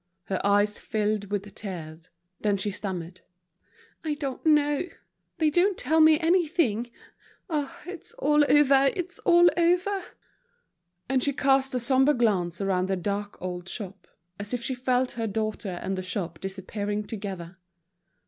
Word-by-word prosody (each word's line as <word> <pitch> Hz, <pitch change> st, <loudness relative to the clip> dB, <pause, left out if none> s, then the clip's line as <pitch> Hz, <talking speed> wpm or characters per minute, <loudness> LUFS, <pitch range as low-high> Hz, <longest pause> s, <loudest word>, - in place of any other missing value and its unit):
Her 190 Hz, 0 st, -3 dB
eyes 205 Hz, +1 st, +2 dB
filled 210 Hz, -2 st, -1 dB
with 205 Hz, 0 st, -3 dB
tears. 165 Hz, -4 st, -7 dB, 0.3 s
Then 205 Hz, -2 st, +1 dB
she 205 Hz, +2 st, -1 dB
stammered: 185 Hz, -3 st, -6 dB, 0.8 s
"I 305 Hz, -2 st, -1 dB
don't 280 Hz, -3 st, -5 dB
know; 295 Hz, +1 st, +3 dB, 0.5 s
they 315 Hz, -3 st, +2 dB
don't 365 Hz, +4 st, +3 dB
tell 315 Hz, +5 st, +2 dB
me 315 Hz, 0 st, +7 dB
anything. 320 Hz, -, +1 dB, 0.6 s
Ah, 295 Hz, -3 st, -2 dB
it's 360 Hz, -1 st, -7 dB
all 295 Hz, +1 st, +3 dB
over, 275 Hz, -2 st, +6 dB
it's 365 Hz, +1 st, -4 dB
all 345 Hz, 0 st, +6 dB
over." 360 Hz, +3 st, +2 dB, 1.0 s
And 265 Hz, 0 st, +1 dB
she 280 Hz, -, +2 dB
cast 270 Hz, -1 st, +2 dB
a -, -, +1 dB
sombre 265 Hz, +4 st, +3 dB
glance 185 Hz, -8 st, +1 dB
around 190 Hz, -2 st, 0 dB
the 190 Hz, -, 0 dB
dark 200 Hz, +2 st, -3 dB
old 180 Hz, 0 st, -5 dB
shop, 200 Hz, -3 st, -7 dB, 0.3 s
as 205 Hz, +4 st, -2 dB
if 240 Hz, -, -5 dB
she 260 Hz, -, -1 dB
felt 255 Hz, 0 st, 0 dB
her 230 Hz, -1 st, -3 dB
daughter 210 Hz, -3 st, -3 dB
and 195 Hz, -, -2 dB
the 185 Hz, -, -3 dB
shop 180 Hz, -3 st, -3 dB
disappearing 200 Hz, +2 st, -4 dB
together. 190 Hz, -5 st, -6 dB
220 Hz, 150 wpm, -27 LUFS, 195-295 Hz, 1.0 s, me